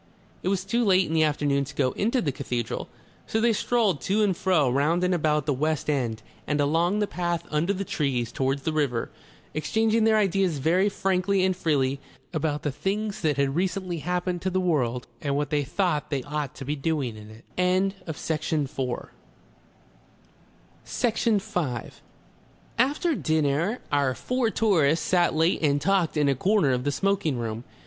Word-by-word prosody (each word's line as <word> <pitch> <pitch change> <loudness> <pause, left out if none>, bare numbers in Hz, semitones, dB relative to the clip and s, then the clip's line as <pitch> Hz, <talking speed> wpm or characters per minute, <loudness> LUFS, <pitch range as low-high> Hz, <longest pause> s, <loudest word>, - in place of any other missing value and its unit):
It - - -4
was 190 -1 0
too 235 +5 +1
late 190 -3 +4
in 160 - -4
the 160 - +3
afternoon 145 -2 +1
to 140 +1 -9
go 130 -3 +1
into 235 - 0
the 145 - 0
cathedral, 125 -3 -4 0.4
so 220 - 0
they 230 0 +3
strolled 210 - +1
to 205 +9 +1
and 195 -3 +2
fro 170 -6 +2
round 145 +8 +2
and 180 0 +2
about 150 -4 +1
the 145 - +1
west 155 +2 0
end 115 -6 -2 0.2
and 150 0 0
along 165 +7 +2
the 210 - +2
path 175 -3 -2
under 155 +5 +1
the 200 0 -2
trees 130 -8 -1
towards 135 +1 -1
the 160 - -1
river, 140 -6 -1 0.4
exchanging 220 +7 +1
their 220 0 +4
ideas 195 -5 +1
very 175 +8 +2
frankly 190 0 +1
and 185 -1 +1
freely 140 -6 0 0.3
about 150 -2 -1
the 145 - 0
things 200 +8 -2
that 150 -4 +1
had 140 0 +1
recently 180 -1 -1
happened 180 +1 -2
to 190 - 0
the 185 0 0
world 130 -9 0 0.2
and 140 -1 -1
what 145 +1 -1
they 145 -1 +1
thought 155 -1 -1
they 140 -3 -2
ought 150 -1 -4
to 135 - -8
be 145 +3 -1
doing 140 -5 -1
in 105 0 -11
it. 110 +1 -15 0.7
Section 155 -1 -1 2.7
5 140 - -4 0.8
After 295 +7 +2
dinner 160 - 0
our 140 -3 +2
four 250 -2 0
tourists 165 -9 +2
sat 175 -3 +2
late 165 +4 +2
and 145 -2 +2
talked 185 -1 +1
in 150 -1 +3
a 140 - +4
corner 185 - +2
of 125 0 -1
the 145 - +1
smoking 195 -3 0
room. 115 -1 -4
160 Hz, 170 wpm, -26 LUFS, 140-190 Hz, 2.7 s, late